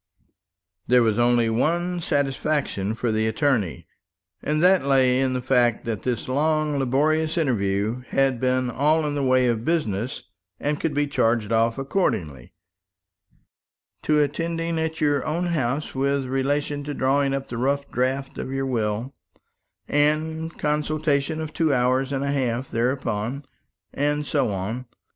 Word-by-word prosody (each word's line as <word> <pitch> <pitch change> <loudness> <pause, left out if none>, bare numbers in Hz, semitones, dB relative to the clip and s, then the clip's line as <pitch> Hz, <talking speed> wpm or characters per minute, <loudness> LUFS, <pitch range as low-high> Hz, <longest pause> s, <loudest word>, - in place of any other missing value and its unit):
There 125 -1 +5
was 110 0 +1
only 120 -1 +3
one 175 +10 0
satisfaction 140 -8 -1
for 115 0 -1
the 110 0 +1
attorney, 110 - 0 0.6
and 155 +2 0
that 185 -2 +5
lay 130 -2 +3
in 130 -1 +1
the 125 -1 -2
fact 120 -3 +2
that 110 -4 -3
this 125 -3 -2
long, 150 +2 +1
laborious 155 +5 +1
interview 110 -5 0
had 135 -3 +1
been 130 0 +1
all 155 +4 +2
in 145 - -1
the 145 - -1
way 130 -1 +3
of 115 -2 0
business, 125 - -1 0.4
and 145 0 -1
could 155 -3 -2
be 145 0 +2
charged 115 -6 +1
for 115 +2 +1
accordingly: 80 - -2 1.5
"To 150 - +2
attending 165 +3 -1
at 160 0 -3
your 145 -3 +2
own 165 +3 -1
house 145 -4 -1
with 140 0 0
relation 145 +2 -1
to 145 -1 -4
drawing 135 +1 +2
up 135 0 -5
the 120 - -5
rough 140 +3 0
draft 135 +3 -1
of - - -4
your 135 0 -1
will, 115 0 -2 0.7
and 160 +2 0
consultation 150 0 0
of 155 -1 -5
two 160 -3 +1
hours 130 +1 +1
and 135 -1 -1
a 140 - 0
half 130 -2 -1
thereupon;" 120 +1 -1 0.5
and 145 +1 0
so 140 -6 +1
on. 110 +6 -4
135 Hz, 150 wpm, -24 LUFS, 120-150 Hz, 1.5 s, There